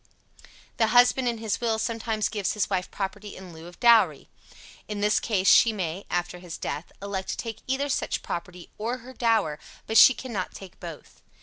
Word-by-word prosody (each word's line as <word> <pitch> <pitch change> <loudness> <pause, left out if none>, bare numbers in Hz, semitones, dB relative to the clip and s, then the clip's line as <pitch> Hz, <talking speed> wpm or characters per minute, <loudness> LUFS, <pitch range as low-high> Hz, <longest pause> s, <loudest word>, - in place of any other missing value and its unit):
The 225 - +3
husband 245 +2 +4
in 235 -1 0
his 220 -1 -2
will 225 -2 +1
sometimes 225 -1 -1
gives 205 -4 -2
his 210 -1 -1
wife 185 -1 -1
property 205 +1 -5
in 185 -2 -11
lieu 160 +1 -11
of 175 - -14
dowry. 235 -2 +4 0.6
In 210 -1 -4
this 210 +1 +3
case, 195 -4 0
she 230 - +7
may, 185 -2 -4
after 175 0 -2
his 175 -2 -8
death, 155 +4 -5
elect 195 -1 -4
to - - -2
take 225 -2 -6
either 265 +2 0
such 275 - -2
property 175 +1 -6
or 235 +4 -2
her 260 - -10
dower; 220 -12 +1 0.3
but 220 - +4
she 260 - +9
cannot 220 -8 -5
take 190 -3 -11
both. 170 -3 -10
210 Hz, 190 wpm, -26 LUFS, 180-230 Hz, 0.6 s, she